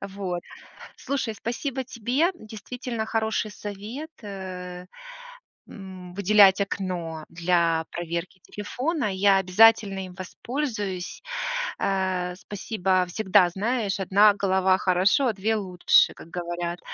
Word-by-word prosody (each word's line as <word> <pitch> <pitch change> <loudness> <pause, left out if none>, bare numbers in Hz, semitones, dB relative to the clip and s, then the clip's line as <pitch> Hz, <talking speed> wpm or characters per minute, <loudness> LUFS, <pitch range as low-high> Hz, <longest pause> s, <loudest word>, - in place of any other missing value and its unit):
вот. 195 -3 -4 0.6
Слушай, 265 -5 -2
спасибо 255 +5 -3
тебе. 255 +7 0
Действительно 230 -1 -6
хороший 220 -1 -1
совет, 210 - -7
э, 185 -3 -7 0.8
м, 185 -3 -10
выделять 200 0 +6
окно 175 -5 -3
для 170 -1 +1
проверки 170 +2 -4
телефона. 260 +7 -3
Я 195 +1 +4
обязательно 195 +1 +4
им 180 - -12
воспользуюсь, 205 -1 -4 0.6
э. 185 -2 -1
Спасибо. 190 -2 -1
Всегда 190 -1 +3
знаешь, 205 +1 -1
1 200 +2 +5
голова 190 -1 +2
хорошо, 190 +9 +3
а - - +2
2 215 +2 0
лучше, 185 -4 +3
как - - -13
говорят. 175 0 -4
195 Hz, 105 wpm, -25 LUFS, 180-220 Hz, 0.8 s, выделять